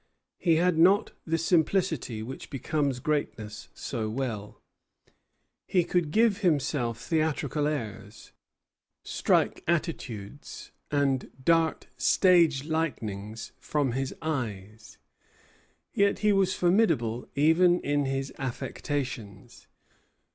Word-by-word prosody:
He 165 -3 +3
had 170 0 +2
not 195 +6 +5 0.2
the 165 +1 +1
simplicity 165 - +1
which 130 +4 -8
becomes 140 -1 -1
greatness 120 -7 -3
so 110 -4 -3
well. 110 -4 -4 1.1
He 180 -2 +3
could 175 -2 0
give 220 +3 +3
himself 140 - 0
theatrical 155 -1 0
airs, 110 -7 -5 0.7
strike - - +1
attitudes, 145 - -4 0.2
and 140 -3 +1 0.2
dart 165 -1 +2
stage 170 -7 +4
lightnings 115 -9 -3
from 145 -4 0
his 135 +2 -3
eyes; 110 -8 -5 1.0
yet 200 0 +2
he 210 - +5
was 195 -1 +2
formidable 175 - +2
even 170 +5 +4
in 145 0 0
his 135 0 -2
affectations. 125 -5 -5
145 Hz, 95 wpm, -28 LUFS, 120-165 Hz, 1.1 s, not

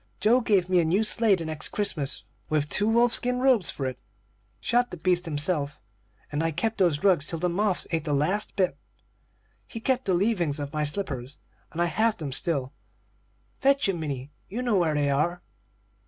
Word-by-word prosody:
Joe 235 +4 +4
gave 200 -6 +2
me 185 -1 +3
a - - +3
new 180 +7 +2
sleigh, 220 -1 +3
the 170 -3 -5
next 155 -1 -1
Christmas, 165 -9 -2 0.3
with 150 -1 +1
two 210 +1 +2
wolf 235 +1 +3
skin 250 0 +1
robes 255 -8 +3
for 135 - -4
it, 130 -1 -4 0.6
shot 245 +1 +1
the 180 - -7
beasts 180 +1 +1
himself, 145 -1 0 0.5
and 145 +1 -1
I 165 - +1
kept 220 +8 -2
those 170 -6 +2
rugs 180 -7 +3
till 165 - -2
the 180 +2 0
moths 195 +2 +1
ate 165 -2 -1
the 150 - -1
last 185 +9 0
bit. 185 -2 0 0.9
He 225 - -7
kept 260 +2 0
the 185 - +2
leavings 175 -7 0
of 145 -1 -5
my 150 0 0
slippers, 145 -6 -3 0.3
and 165 - -7
I 175 - +3
have 220 +7 +1
them 150 -5 -5
still. 135 -1 0 0.9
Fetch 275 -3 +3
'em, 180 -3 -1
Minnie 140 -3 -5 0.2
you 235 +6 -4
know 235 -5 +2
where 160 -3 +1
they 145 -1 +1
are." 175 +5 0
175 Hz, 195 wpm, -26 LUFS, 150-210 Hz, 0.9 s, Joe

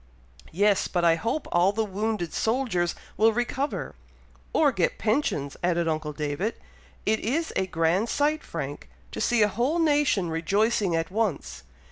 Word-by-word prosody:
"Yes, 200 +3 +2
but 175 -2 0
I 165 - +6
hope 230 - -2
all 175 +3 +4
the 220 +2 -1
wounded 205 -3 -2
soldiers 220 -8 0 0.2
will 225 +1 +5
recover." 250 +5 -2 0.6
"Or 300 -3 +4
get 185 -8 0
pensions," 210 - 0
added 170 -1 +1
uncle 155 -1 -1
David. 150 +8 -2 0.5
"It 220 +1 +2
is 310 +9 -1
a 190 - 0
grand 175 +6 +1
sight, 300 +4 +1
Frank, - - -6 0.2
to - - -5
see 240 -3 +3
a - - +4
whole 245 - 0
nation 290 - +2
rejoicing 200 +3 +1
at 165 +2 -2
once! 180 - -2
205 Hz, 150 wpm, -26 LUFS, 170-235 Hz, 0.6 s, I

